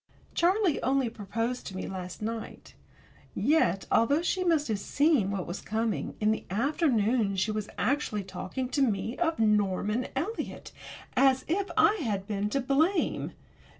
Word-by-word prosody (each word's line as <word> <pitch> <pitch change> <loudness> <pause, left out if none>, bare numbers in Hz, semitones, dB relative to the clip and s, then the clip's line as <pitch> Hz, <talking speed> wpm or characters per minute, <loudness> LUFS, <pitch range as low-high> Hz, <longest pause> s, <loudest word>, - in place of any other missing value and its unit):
Charlie 365 -2 +2
only 265 -2 +1
proposed 225 +4 -3
to 190 - -6
me - - -4
last 185 +1 -6
night, 225 +1 -6 0.6
yet, 195 - +2
although 285 +8 +3
she 370 +1 0
must 325 -4 +2
have 210 -2 0
seen 285 -3 +2
what 195 -3 -2
was 175 - -5
coming, 220 0 -2
in 215 0 +3
the 220 - -2
afternoon 230 - +1
she 190 +3 0
was 215 -1 -3
actually 230 -4 0
talking 255 +7 -4
to 280 - 0
me 225 -1 0
of 330 -2 +1
Norman 210 +2 +1
Eliot 360 +12 -4 0.4
as 265 0 +4
if 390 +5 0
I 425 - +5
had 205 -7 -2
been 205 -1 -2
to 275 - 0
blame! 310 +8 +1
230 Hz, 150 wpm, -29 LUFS, 205-290 Hz, 0.6 s, I